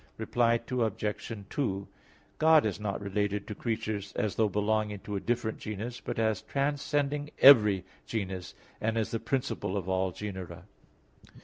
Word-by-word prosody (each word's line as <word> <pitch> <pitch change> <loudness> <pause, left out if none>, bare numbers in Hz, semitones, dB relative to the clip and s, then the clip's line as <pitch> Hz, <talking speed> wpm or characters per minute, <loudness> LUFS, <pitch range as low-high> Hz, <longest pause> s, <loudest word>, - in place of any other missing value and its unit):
Reply 115 -1 +2
Obj. 110 -3 -2
2: 100 -9 -1 0.5
God 160 -3 +6
is 105 -3 -1
not 105 -2 -2
related 105 0 -1
to - - -5
creatures 110 -3 -3
as 105 -1 -1
though 110 -2 +2
belonging 105 +1 0
to 105 - -5
a - - 0
different 115 0 -1
genus, 110 +3 -5
but - - -4
as 110 -3 +1
transcending 145 +1 -1
every 105 -9 +8 0.2
genus, 95 -4 -4 0.3
and 110 +1 0
as 110 - 0
the 115 - -1
principle 130 -7 -2
of 95 -2 -4
all 95 0 +1
genera. 95 -2 -7
110 Hz, 145 wpm, -30 LUFS, 100-120 Hz, 0.5 s, every